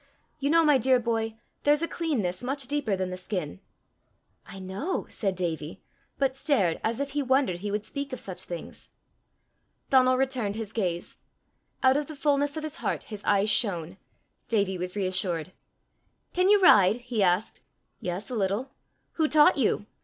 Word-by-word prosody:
You 280 0 0
know, 330 +2 +5
my 295 -4 +5
dear 255 +1 +4
boy, 225 -2 -1 0.3
there's 295 +2 +3
a - - 0
cleanness 230 - -2
much 270 +1 -3
deeper 280 -7 0
than 185 -1 -3
the 185 - -5
skin!" 180 - -4 0.9
"I - - -10
know!" 190 - -3
said 195 -3 -2
Davie, 165 -1 -4 0.3
but 270 -1 +1
stared 245 - +1
as 225 +2 -1
if 280 0 -2
he 290 +1 -1
wondered 260 -9 +1
he 205 +3 -4
would 210 +1 -2
speak 280 +2 -4
of 255 - -5
such 185 -5 -6
things. 175 -2 -8 1.0
Donal 255 -1 +5
returned 255 -6 -1
his 220 -2 -6
gaze. 175 -6 -2 0.7
Out 260 +1 +5
of 295 -1 -2
the 310 - -8
fullness 285 +1 +1
of 310 - -4
his 310 0 -6
heart - - -2
his 210 - -7
eyes 205 +1 +3
shone. 180 -6 0 0.5
Davie 200 -5 0
was 180 +1 -3
reassured. 185 -3 -1 0.8
"Can 365 +2 +3
you 415 0 +6
ride?" 200 - +7
he 245 -2 -3
asked. 185 +3 +1 0.4
"Yes, 185 +7 -4
a - - -2
little." 210 +6 -1 0.5
"Who 315 -2 +3
taught 300 -1 +5
you?" 215 -4 +1
225 Hz, 170 wpm, -27 LUFS, 185-275 Hz, 1.0 s, ride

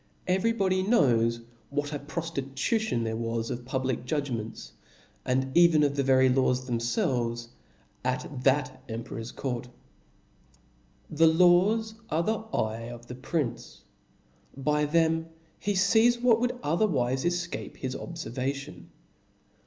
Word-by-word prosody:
^ 185 - +3
Eycf 190 - -2
y 230 - +4
body 190 -4 +1
knows 115 - +3 0.3
what 145 +1 -2
a 145 - -2
profticucion 145 - -2
there 110 0 -2
wasof 115 +1 -3
public 130 -1 -2
judgraents, 125 -5 -4 0.5
and 130 +1 0
even 170 -3 +6
of 145 -1 +2
tbe 140 -1 0
very 130 0 +5
laws 130 0 +2
themfelves 120 - -1 0.5
at 130 +1 -3
that 130 -1 +1
emperor's 115 +1 -6
court. 125 -2 -4 1.4
The 160 +1 +5
laws 180 +7 +4 0.2
are 160 +2 +1
the 220 +4 0
eye 110 +1 -2
of 120 0 -9
the 125 - -8
prince; 135 +1 -4 0.7
by 150 +2 +1
them 165 +1 +2 0.3
he 205 0 -1
fees 220 +5 +4
what 235 -2 +4
would 245 +1 -1
othefwiie 140 - +1
efcape 175 0 -3
his 130 -1 -4
oblerva 135 -5 -4
tion. 140 +2 -10
140 Hz, 130 wpm, -28 LUFS, 125-170 Hz, 1.4 s, even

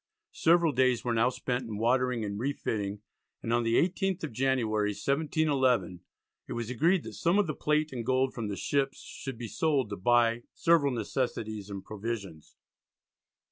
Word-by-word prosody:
Several 170 -1 +4
days 130 -2 +2
were 120 - +1
now 115 +2 +3
spent 125 0 -3
in 110 -2 -5
watering 125 0 +1
and 100 0 -4
re 140 +4 0
fitting, 105 -5 -3 0.4
and 115 - -1
on 120 - +3
the 115 0 +1
18th 185 +1 +1
of 160 - -3
January, 110 -4 +1
1711, 135 - +1 0.5
it - - -5
was 120 0 -4
agreed 165 +8 +2
that - - -8
some 170 +4 +1
of 205 - +4
the 155 - -2
plate 150 0 0
and 120 -2 -3
gold 130 +2 +1
from 115 -3 -4
the 100 -1 -4
ships 140 -1 0
should 135 -3 -7
be 120 0 -5
sold 135 -3 0
to - - -2
buy 120 +3 +3
"several 165 -4 +3
necessaries 110 -3 -3
and 100 -1 -7
provisions." 100 -7 -6
125 Hz, 175 wpm, -29 LUFS, 110-140 Hz, 0.5 s, Several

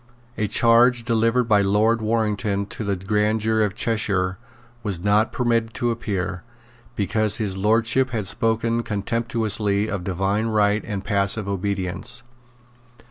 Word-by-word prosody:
A 105 - -1
charge 120 +2 +4
delivered 115 +1 +2
by 105 -3 +3
Lord 105 +4 +2
Warrington 105 -2 0
to 110 - -6
the 100 -1 -1
grand 105 +3 0
jury 110 0 +1
of 100 -1 -4
Cheshire 95 -5 -1 0.4
was 100 -6 -3
not 105 +2 +3
permitted 115 -2 0
to 120 0 0
appear, 95 -5 -3 0.5
because 105 +1 0
His 105 -4 -1
Lordship 115 +6 +2
had 110 -5 -3
spoken 115 +3 +1
contemptuously 110 -1 -1
of 100 -4 -3
divine 95 +4 -1
right 105 -1 +2
and 100 -2 -5
passive 100 0 0
obedience. 100 +5 -3
110 Hz, 135 wpm, -23 LUFS, 100-115 Hz, 0.5 s, charge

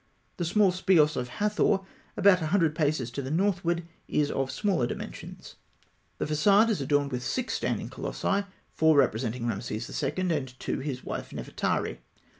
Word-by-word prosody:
The 175 - -1
small 195 +3 +4
speos 175 -5 +3
of 125 - -2
Hathor, 210 - +1 0.4
about 190 -3 +5
a 160 - -1
hundred 165 -3 +2
paces 150 -6 0
to 140 - -4
the 130 - -5
northward, 175 0 +1 0.2
is 145 -1 +1
of 135 -1 -1
smaller 185 - 0
dimensions. - - -8 0.6
The - - -1
façade 200 +9 +4
is 215 - 0
adorned 145 -1 +1
with 125 -1 -2
six 255 - -2
standing - - -1
colossi, 200 0 -2 0.3
four 160 -1 +4
representing 115 -2 +1
Rameses 110 0 -3
II., - - 0 0.2
and 130 -3 -5
two - - -2
his 130 -3 -4
wife, - - -5
Nefertari. - - -2
155 Hz, 160 wpm, -28 LUFS, 130-190 Hz, 0.6 s, about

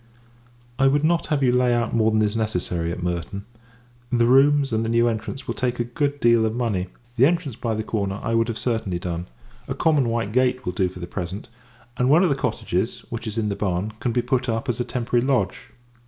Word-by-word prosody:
I 135 - +5
would 145 +2 +2
not 165 +1 +2
have 145 -3 0
you 125 - +4
lay 125 -1 +3
out 120 -1 -1
more 110 -1 +3
than 110 0 +2
is 105 +1 0
necessary, 90 -6 -1
at 85 - -5
Merton. 90 +3 -3 0.7
The 120 -1 +3
rooms, 135 +1 +4
and 110 0 +1
the 115 - -2
new 115 +1 +3
entrance, 115 +4 -3
will - - -2
take 125 -1 -2
a - - +2
good 145 +4 -2
deal 115 -2 +4
of 110 0 0
money. 110 -7 -1 0.3
The 130 +4 +6
entrance 165 -7 -1
by 115 -1 -2
the 110 - -2
corner 100 -3 -2
I 115 - -1
would 115 0 +2
have 115 -2 -3
certainly 110 -5 -1
done; 85 0 -4 0.4
a - - -3
common 145 -7 +2
white 115 -2 -1
gate 130 +1 +1
will 90 - -1
do 90 0 +1
for 90 - -11
the 85 - -5
present; 95 +4 -6 0.5
and 125 +1 +2
one 160 +6 +6
of 180 - +3
the 140 - +2
cottages, 140 - -2
which 115 0 -5
is 110 +1 -5
in 110 -2 0
the 100 - -2
barn, 95 +2 -2
can 120 - -1
be 120 +1 0
put 125 0 0
up, 115 0 -2
as 125 - -1
a - - +1
temporary 120 -1 -1
lodge. 125 -8 0
115 Hz, 235 wpm, -23 LUFS, 105-130 Hz, 0.7 s, The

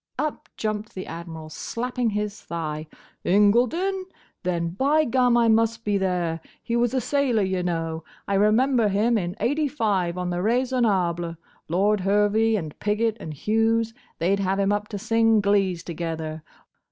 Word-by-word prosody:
Up 300 +2 -3
jumped 215 0 -3
the 185 - -5
Admiral, 160 -1 -8
slapping 245 +5 -2
his 210 0 -3
thigh. 155 -2 -4 0.4
"Incledon! 245 - +3 0.4
Then, 170 -2 -1
by 280 - +2
gum, 245 -1 +3
I 235 -1 +4
must 225 +1 +2
be 205 -1 +1
there! 175 -4 -1 0.2
He 235 - -2
was 240 +1 +1
a - - +3
sailor, 255 -4 +1
y' 190 -1 0
know. 165 -2 -2 0.2
I 200 - -1
remember 220 +4 +3
him 210 +4 +2
in 180 -3 -1
'85, 225 - 0
on 180 0 -2
the 175 0 -1
Raisonable. 200 -8 +1 0.3
Lord 200 +5 +2
Hervey, 210 +3 +2
and 160 -7 -5
Pigot 215 +1 +1
and 155 - -6
Hughes—they 225 - 0
'd - - -6
have 195 0 0
him 200 0 +2
up 205 0 -1
to 210 - -5
sing 225 +1 +3
glees 195 -4 +1
together! 160 -2 -4
205 Hz, 155 wpm, -24 LUFS, 175-230 Hz, 0.4 s, I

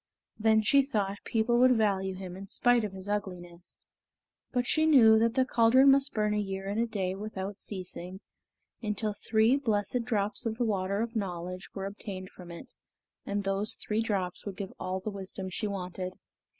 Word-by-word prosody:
Then 220 0 +4
she 275 +6 +5
thought 205 -7 -2
people 235 +1 +2
would 255 -1 +6
value 190 -3 +1
him 185 -1 -7
in 195 +1 -9
spite 245 +3 +3
of 210 - -3
his 190 0 -9
ugliness. 180 -4 -6 0.7
But 245 -1 0
she 315 +4 +2
knew 225 -8 +7
that 230 +1 +2
the 260 - +3
caldron 255 +3 +5
must 275 0 +3
burn 210 -1 +1
a 210 - +1
year 195 -1 -4
and 205 +3 -1
a 235 - +1
day 195 -5 -2
without 200 -1 -5
ceasing, 185 -1 -6 0.6
until 210 -1 -1
three 220 +4 +2
blessed 230 -2 0
drops 210 -3 0
of 220 0 -3
the 240 - +1
water 200 -1 0
of 235 0 -6
knowledge 180 -2 -4
were 195 -1 -4
obtained 195 -2 -7
from 180 -1 -12
it; 170 +9 -9 0.6
and 200 0 -1
those 195 +2 0
three 215 +1 -2
drops 195 -5 -2
would 200 -2 -6
give 195 -2 -6
all 185 0 -2
the 215 - -4
wisdom 190 -1 -5
she 210 +4 -1
wanted. 185 -2 -4
205 Hz, 185 wpm, -29 LUFS, 190-225 Hz, 0.7 s, knew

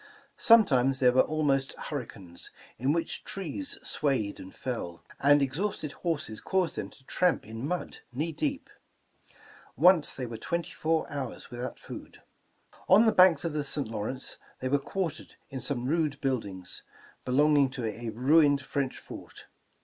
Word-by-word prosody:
Sometimes 135 - +5
there 125 -1 +5
were 130 - +5
almost 140 -3 +1
hurricanes, 100 - -7 0.3
in 130 +4 +2
which 165 +2 -2
trees 195 - -4
swayed 130 -9 -1
and 95 - -9
fell, 90 -10 -5 0.2
and 145 +1 +5
exhausted 155 +2 -2
horses 145 -12 -3
caused 185 -4 0
them - - -4
to 135 - -18
tramp 180 +2 +1
in 115 +5 -5
mud 180 +2 -3
knee 150 +7 -1
deep. 285 - -3 1.1
Once 180 -4 +5
they 130 - -3
were 115 -1 -6
twenty 170 +6 -2
four 160 0 0
hours 140 -1 -5
without 120 +1 -5
food. - - -10 0.7
On 205 +5 +7
the 220 - +5
banks 180 -6 +6
of 165 - -1
the 150 -1 -1
St. 140 -3 -3
Lawrence 115 +4 -4 0.2
they 130 - -2
were 140 +1 +3
quar 180 +4 -2
tered - - -12 0.2
in 135 -1 -5
some 125 -1 -1
rude 150 -1 0
buildings, 100 -9 -2 0.4
belonging 145 +1 +4
to 130 -3 -5
a 115 +2 -4
ruined 140 +5 +4
French 140 -2 -2
fort. - - -11
140 Hz, 155 wpm, -29 LUFS, 125-165 Hz, 1.1 s, On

